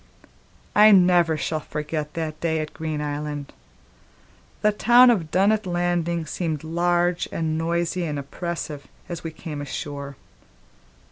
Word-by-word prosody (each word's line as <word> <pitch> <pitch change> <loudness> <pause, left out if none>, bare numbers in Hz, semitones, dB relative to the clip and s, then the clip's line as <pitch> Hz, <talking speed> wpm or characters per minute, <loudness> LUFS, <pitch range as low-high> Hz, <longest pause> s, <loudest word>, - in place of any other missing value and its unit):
I 210 +1 +8
never 175 -5 +5
shall 155 +1 -2
forget 150 0 -5
the 160 -2 -2
day 160 -1 0
at 155 -1 -5
Green 155 -2 -3
Island. 145 -1 -4 1.1
The 210 - +5
town 240 +4 +6
of 175 -9 -1
Dunnet 200 +4 +2
Landing 175 -1 0
seemed 160 -1 -3
large 175 +2 +1
and 160 -1 -1
noisy 170 +2 -1
and 150 -2 -3
oppressive 150 -1 -5 0.2
as 170 -2 -6
we 165 - -3
came 155 -2 -7
ashore. 140 0 -6
165 Hz, 130 wpm, -24 LUFS, 150-175 Hz, 1.1 s, I